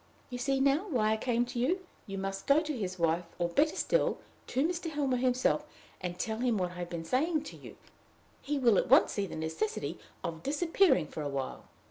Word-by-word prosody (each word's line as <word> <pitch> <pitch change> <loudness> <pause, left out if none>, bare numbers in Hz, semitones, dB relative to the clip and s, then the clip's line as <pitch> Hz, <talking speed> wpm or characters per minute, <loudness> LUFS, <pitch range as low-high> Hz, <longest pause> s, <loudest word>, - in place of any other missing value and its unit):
You 245 - -4
see 270 +2 +1
now 280 +8 +3
why 220 -8 +2
I 220 - +2
came 240 +1 +1
to 245 0 -5
you! 360 +10 0 0.2
You 195 -1 -5
must 195 0 -4
go 280 +2 +6
to 310 -2 -3
his 185 -5 -3
wife, 170 +1 +1
or, 175 -1 0
better 300 - +2
still, - - +1 0.3
to 270 +5 +1
Mr. 345 -1 -3
Helmer 285 -4 0
himself, 255 0 +2 0.4
and 180 -1 -4
tell 220 +4 -2
him 240 -3 +1
what 180 -2 -1
I 180 - -9
have 175 -1 -4
been 170 -1 -5
saying 305 - +1
to - - -9
you. - - -12 0.6
He 295 +1 -1
will 235 -7 +4
at - - -2
once - - +6
see 200 -1 -1
the - - -7
necessity 160 0 -3 0.2
of 165 -1 -4
disappearing 310 - +3
for 155 - -7
a 145 - -2
while." 135 -1 -4
240 Hz, 215 wpm, -31 LUFS, 180-285 Hz, 0.6 s, go